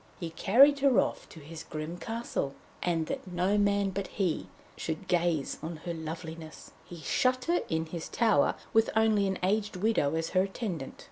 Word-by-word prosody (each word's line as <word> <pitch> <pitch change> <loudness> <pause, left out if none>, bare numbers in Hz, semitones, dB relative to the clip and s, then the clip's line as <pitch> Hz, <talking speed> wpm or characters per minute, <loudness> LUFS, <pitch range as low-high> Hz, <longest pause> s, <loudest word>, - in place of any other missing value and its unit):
He 165 -2 -4
carried 275 - +5
her 270 -3 +5
off - - -1
to 160 - -12
his 160 +2 -9
grim 155 +1 -5
castle, 225 -10 -3 0.3
and 165 -2 0
that - - -5
no 180 +3 +1
man 200 -1 +2
but 195 +1 -3
he 185 -6 -1 0.3
should 160 +4 -4
gaze 170 -5 +1
on 165 +2 -5
her 170 - -2
loveliness, 160 0 -7
he 175 - -10
shut 255 - +1
her 345 +1 +2
in 160 0 0
his 165 0 -6
tower, 230 -1 +3 0.2
with 225 0 +4
only 220 -2 +3
an 190 - -1
aged 205 +2 +1
widow 180 -7 +1
as 165 0 -1
her 185 - +3
attendant. 190 - -4
180 Hz, 180 wpm, -30 LUFS, 160-215 Hz, 0.3 s, carried